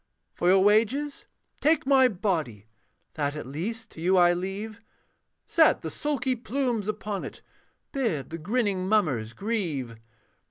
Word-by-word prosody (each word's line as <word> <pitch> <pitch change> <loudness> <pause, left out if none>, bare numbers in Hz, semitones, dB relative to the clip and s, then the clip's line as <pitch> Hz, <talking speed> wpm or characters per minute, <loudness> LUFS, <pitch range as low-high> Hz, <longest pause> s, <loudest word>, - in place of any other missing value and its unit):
For 175 - -1
your 190 +1 +6
wages, 230 +8 +2 0.3
take 310 -1 +2
my 265 -1 +6
body, 165 - -2 0.5
That 145 -1 -2
at 150 - -6
least 210 - -5
to 160 - -10
you 185 +3 +3
I 175 -1 +6
leave; 200 +5 -5 0.6
Set - - +4
the - - -4
sulky 275 -3 -1
plumes 245 -3 -2
upon 210 -2 -3
it, - - -9 0.5
Bid 200 - -2
the 165 - -5
grinning 195 0 0
mummers 135 - +1
grieve. 160 - -3
200 Hz, 135 wpm, -27 LUFS, 165-230 Hz, 0.6 s, your